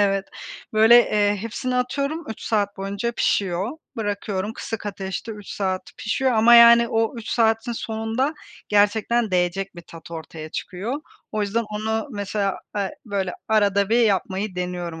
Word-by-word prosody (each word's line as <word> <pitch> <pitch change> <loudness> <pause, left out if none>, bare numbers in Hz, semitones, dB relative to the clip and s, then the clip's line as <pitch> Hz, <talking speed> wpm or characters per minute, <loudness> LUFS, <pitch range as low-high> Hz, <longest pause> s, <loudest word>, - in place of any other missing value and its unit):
Evet. 195 -1 +2 0.5
Böyle, 220 +2 +7
eee, 205 0 +2
hepsini 230 +4 -3
atıyorum 280 +6 -1
3 220 - -7
saat 205 -3 0
boyunca 200 +4 -3
pişiyor, 195 0 0 0.3
bırakıyorum, 205 -1 -2
kısık 225 -1 -6
ateşte 195 +2 -5
3 210 -2 -11
saat 190 -2 -1
pişiyor 255 +4 0
ama 225 +2 +6
yani 235 0 +8
o 225 +2 0
3 230 -1 -8
saatin 225 +1 +2
sonunda 225 +6 -2 0.3
gerçekten 215 +2 +2
değecek 185 +2 0
bir 170 - -9
tat 165 0 -13
ortaya 160 -1 -7
çıkıyor. 215 - -4 0.3
O 215 - -1
yüzden 215 +3 0
onu 220 +4 -2
mesela, 200 -2 -2 0.2
a, 200 -2 0 0.2
böyle 195 -3 -2 0.2
arada 200 -2 +3
bir 230 +2 +3
yapmayı 200 -2 0
deniyorum 175 -2 -4
210 Hz, 150 wpm, -23 LUFS, 195-230 Hz, 0.5 s, yani